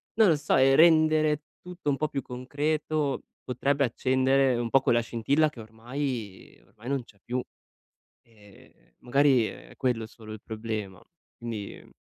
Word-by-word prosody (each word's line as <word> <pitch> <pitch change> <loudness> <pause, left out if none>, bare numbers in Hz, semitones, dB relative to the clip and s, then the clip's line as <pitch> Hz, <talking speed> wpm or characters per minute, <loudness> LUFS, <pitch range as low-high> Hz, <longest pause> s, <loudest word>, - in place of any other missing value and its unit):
non 220 -2 +5
lo 160 - +4
so, 145 - 0
e 135 +1 +5
rendere 155 -1 +4 0.2
tutto 180 -4 -5
un 140 - +2
po' 155 - -1
più 135 - -3
concreto 145 +3 -2 0.2
potrebbe 140 +2 0
accendere 130 +2 +2
un 120 -1 -2
po' 135 +2 +4
quella 120 -2 +3
scintilla 135 +7 +1
che 120 -7 -11
ormai 115 -1 -6
ehm, - - -27
ormai 115 +4 -11
non 135 -2 -1
c'è 100 -4 -22
più. 125 +1 -2 0.8
Ehm, 105 -4 -20 0.3
magari 130 -2 +3
è - - -12
quello 120 -4 -1
solo 110 -2 -12
il 110 - -8
problema. 110 -4 -5 0.3
Quindi, 115 -4 -6
ehm, - - -15
130 Hz, 160 wpm, -27 LUFS, 115-145 Hz, 0.8 s, non